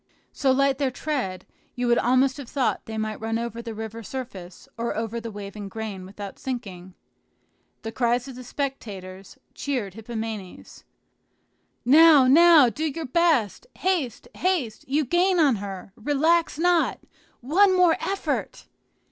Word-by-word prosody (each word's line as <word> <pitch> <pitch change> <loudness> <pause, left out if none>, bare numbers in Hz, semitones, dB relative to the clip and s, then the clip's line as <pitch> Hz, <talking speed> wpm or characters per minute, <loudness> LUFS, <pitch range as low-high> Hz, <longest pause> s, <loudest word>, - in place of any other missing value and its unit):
So 270 -2 +2
light 275 0 +2
their 275 -2 +1
tread, 255 -9 -3 0.3
you 245 - -2
would 240 0 +3
almost 260 +2 +2
have 275 -4 -8
thought 265 -4 -1
they 220 0 -5
might 215 0 -3
run 225 0 -1
over 235 0 -4
the 230 -2 -7
river 220 +1 -6
surface 205 -7 -8
or 235 0 -3
over 225 +1 -3
the 230 - -6
waving 205 -1 -8
grain 200 -3 -6
without 200 0 -9
sinking. 190 -8 -6 0.9
The 225 - -4
cries 240 +1 0
of 265 - -8
the 255 +1 -10
spectators 200 -9 -6 0.2
cheered 245 -9 -3
Hippomenes, 220 -3 -7 1.0
"Now, 300 +1 +7
now, 315 +1 +7
do 295 +8 -3
your 315 +1 -3
best! 310 - +1
haste, 335 - -1
haste! 325 - -1
you 290 +3 +1
gain 355 +5 +2
on 280 -8 +4
her! 195 -1 -7
relax 295 +7 +1
not! 345 0 +2 0.4
one 370 +9 +4
more 355 -3 +5
effort!" 390 0 -3
245 Hz, 145 wpm, -25 LUFS, 220-295 Hz, 1.0 s, Now